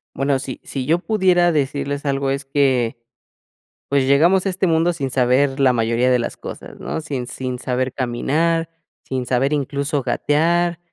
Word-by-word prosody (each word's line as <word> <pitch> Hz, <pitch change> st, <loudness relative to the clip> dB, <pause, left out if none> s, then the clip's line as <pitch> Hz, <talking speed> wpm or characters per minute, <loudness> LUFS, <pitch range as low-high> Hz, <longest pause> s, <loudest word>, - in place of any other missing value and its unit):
Bueno, 135 Hz, 0 st, +1 dB
sí 130 Hz, -1 st, -6 dB
sí 130 Hz, -2 st, -4 dB
yo 165 Hz, +4 st, +2 dB
pudiera 180 Hz, -4 st, +2 dB
decirles 145 Hz, -1 st, -2 dB
algo, 135 Hz, -1 st, 0 dB
es 140 Hz, +1 st, -2 dB
que, 135 Hz, -4 st, +1 dB, 0.9 s
pues, 140 Hz, -1 st, +2 dB
llegamos 170 Hz, +8 st, +4 dB
a -, -, +3 dB
este 190 Hz, 0 st, 0 dB
mundo 165 Hz, +1 st, +2 dB
sin 140 Hz, -6 st, -3 dB
saber 135 Hz, +2 st, +2 dB
la 130 Hz, -2 st, +4 dB
mayoría 115 Hz, +2 st, +1 dB
de 125 Hz, -1 st, +3 dB
las 120 Hz, -, -4 dB
cosas, -, -, -9 dB
¿no?, -, -, -4 dB
sin 140 Hz, -5 st, -4 dB
sin 125 Hz, 0 st, -5 dB
saber 130 Hz, 0 st, -2 dB
caminar, 160 Hz, +7 st, 0 dB, 0.3 s
sin 130 Hz, -2 st, -4 dB
saber 130 Hz, +3 st, +1 dB
incluso 140 Hz, 0 st, -1 dB
gatear, 165 Hz, +7 st, +1 dB
140 Hz, 165 wpm, -20 LUFS, 130-160 Hz, 0.9 s, llegamos